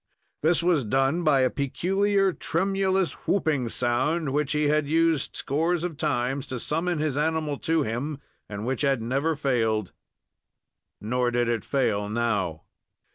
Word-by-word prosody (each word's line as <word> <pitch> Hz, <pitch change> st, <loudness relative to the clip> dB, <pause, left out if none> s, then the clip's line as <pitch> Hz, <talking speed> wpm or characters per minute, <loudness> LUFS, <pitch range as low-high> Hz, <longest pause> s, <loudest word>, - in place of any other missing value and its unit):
This 165 Hz, +2 st, +3 dB
was 170 Hz, -6 st, +3 dB
done 135 Hz, +9 st, +1 dB
by 145 Hz, -4 st, +4 dB
a 130 Hz, -, +2 dB
peculiar, 195 Hz, +7 st, +1 dB
tremulous 190 Hz, +1 st, 0 dB
whooping 150 Hz, -10 st, +1 dB
sound, 130 Hz, +6 st, 0 dB
which 150 Hz, 0 st, 0 dB
he 150 Hz, 0 st, +1 dB
had 150 Hz, 0 st, +2 dB
used 165 Hz, -1 st, +1 dB
scores 165 Hz, +4 st, 0 dB
of 175 Hz, -3 st, -3 dB
times 140 Hz, -2 st, -1 dB
to 130 Hz, -1 st, -4 dB
summon 165 Hz, +6 st, -1 dB
his 150 Hz, -2 st, -1 dB
animal 155 Hz, -2 st, -1 dB
to 160 Hz, -1 st, +1 dB
him, 135 Hz, +6 st, -3 dB, 0.3 s
and 105 Hz, +1 st, -5 dB
which 130 Hz, 0 st, -2 dB
had 135 Hz, -3 st, +2 dB
never 135 Hz, +8 st, 0 dB
failed. 115 Hz, -8 st, 0 dB, 1.1 s
Nor 125 Hz, +3 st, 0 dB
did 120 Hz, 0 st, 0 dB
it 115 Hz, -3 st, -1 dB
fail 110 Hz, -7 st, 0 dB
now. 105 Hz, -8 st, -1 dB
145 Hz, 145 wpm, -26 LUFS, 120-165 Hz, 1.1 s, by